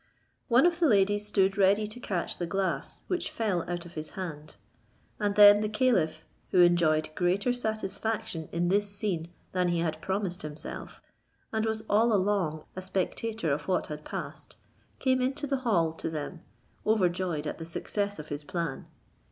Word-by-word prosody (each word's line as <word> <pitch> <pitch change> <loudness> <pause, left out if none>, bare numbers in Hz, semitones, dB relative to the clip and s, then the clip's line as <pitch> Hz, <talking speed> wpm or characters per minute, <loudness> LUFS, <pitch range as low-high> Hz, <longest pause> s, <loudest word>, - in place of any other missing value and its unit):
One 250 +4 +5
of 345 -1 +2
the 335 - +4
ladies 205 -2 +3
stood 195 -1 +2
ready 200 +2 +4
to 215 +3 -7
catch 185 -7 -3
the 175 - -2
glass, 195 +2 -2
which 360 -1 -2
fell 205 -6 0
out 175 -1 -3
of 175 - -12
his 155 0 -5
hand; 155 -5 -6 0.6
and 205 -2 0
then 205 0 +9
the 215 - 0
caliph, 185 -10 +1 0.2
who 180 - +5
enjoyed 160 -3 +3
greater 185 +8 +1
satisfaction 220 -5 -2
in 175 +1 0
this 205 +2 +2
scene 195 -5 -2 0.2
than 180 -1 +1
he 175 -1 +1
had 160 -2 -2
promised 190 -1 -2
himself, 150 0 -7 0.5
and 220 0 +1
was 220 0 -1
all 225 +3 +4
along 185 -6 +1
a 185 - -4
spectator 190 0 -2
of 150 +1 -4
what 185 -1 +1
had 150 0 -8
passed, - - -6 0.4
came 260 -1 +2
into 270 +3 -1
the 275 -1 0
hall 180 -11 +1
to 165 - -4
them, 160 +2 -5 0.4
overjoyed 180 -6 +1
at 150 - -4
the 165 - -5
success 205 +4 -2
of 150 0 -8
his 145 0 -4
plan. 165 -2 -4
190 Hz, 170 wpm, -29 LUFS, 170-215 Hz, 0.6 s, then